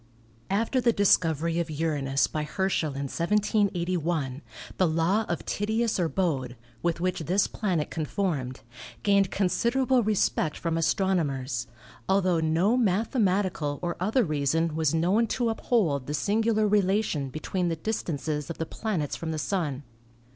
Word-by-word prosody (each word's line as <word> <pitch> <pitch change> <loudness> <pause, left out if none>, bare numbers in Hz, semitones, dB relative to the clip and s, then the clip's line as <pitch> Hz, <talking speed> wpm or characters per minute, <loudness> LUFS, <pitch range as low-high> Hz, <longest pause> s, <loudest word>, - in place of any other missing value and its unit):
After 225 +6 +1
the 235 0 +4
discovery 170 -5 +2
of 170 -1 -2
Uranus 145 -3 0
by 155 - -3
Herschel 155 -2 -1
in 140 - -3
1781 175 -5 0 0.4
the 185 - +3
law 165 +7 +1
of 170 - -3
Titius 220 +1 0
or 170 -2 +1
Bode, 135 -10 -1 0.2
with 170 -1 0
which 185 +1 -1
this 180 +5 +1
planet 180 -8 -2
conformed, 150 -5 -2 0.4
gained 200 -2 +3
considerable 240 +7 +2
respect 205 -7 0
from 165 -1 -2
astronomers, 155 - 0 0.4
altho 185 -4 +3
no 165 +8 +2
mathematical 195 - +1
or 175 -1 -1
other 220 +8 +2
reason 155 0 0
was 160 -1 +1
known 190 +8 +2
to 240 +1 0
uphold 185 - 0
the 150 - -2
singular 215 +3 +1
relation 195 -8 +1
between 175 +6 -2
the 165 - 0
distances 155 -6 -3
of 170 - -5
the 160 - -2
planets 175 -7 -3
from 165 - -5
the 160 - -2
Sun. 150 -5 -2
175 Hz, 140 wpm, -27 LUFS, 155-205 Hz, 0.4 s, the